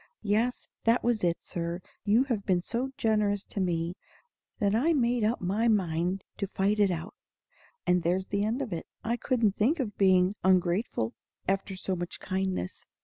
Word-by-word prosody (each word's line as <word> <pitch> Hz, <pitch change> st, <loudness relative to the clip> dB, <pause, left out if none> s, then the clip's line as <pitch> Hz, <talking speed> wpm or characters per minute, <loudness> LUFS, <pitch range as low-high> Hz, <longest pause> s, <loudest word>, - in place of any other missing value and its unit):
Yes; 220 Hz, +4 st, 0 dB
that 230 Hz, +2 st, +3 dB
was 235 Hz, -4 st, +1 dB
it, 170 Hz, -1 st, +1 dB
Sir. 170 Hz, 0 st, -3 dB, 0.3 s
You 220 Hz, +5 st, +5 dB
had 235 Hz, -7 st, -2 dB
been 180 Hz, -3 st, +1 dB
so 240 Hz, +7 st, -2 dB
generous 210 Hz, -2 st, +1 dB
to -, -, -6 dB
me, 170 Hz, -2 st, 0 dB, 0.6 s
that 200 Hz, -1 st, +1 dB
I 285 Hz, +10 st, +3 dB
made 240 Hz, -4 st, +2 dB
up 220 Hz, +3 st, +1 dB
my 200 Hz, +6 st, +1 dB
mind 185 Hz, -3 st, +1 dB
to 200 Hz, -, -2 dB
fight 200 Hz, +2 st, +1 dB
it 205 Hz, -2 st, +5 dB
out; 175 Hz, +1 st, -3 dB, 0.7 s
and 180 Hz, 0 st, +3 dB
there's 180 Hz, +3 st, 0 dB
the 200 Hz, 0 st, 0 dB
end 230 Hz, +6 st, 0 dB
of 225 Hz, -8 st, -5 dB
it. 165 Hz, -, -5 dB, 0.2 s
I 230 Hz, +1 st, 0 dB
couldn't 235 Hz, -5 st, +1 dB
think 280 Hz, +10 st, +2 dB
of 215 Hz, -7 st, -3 dB
being 185 Hz, -1 st, +5 dB
ungrateful 180 Hz, -, +2 dB, 0.3 s
after 195 Hz, 0 st, 0 dB
so 185 Hz, 0 st, -2 dB
much 175 Hz, 0 st, -5 dB
kindness." 190 Hz, -, -3 dB
200 Hz, 175 wpm, -29 LUFS, 180-225 Hz, 0.7 s, You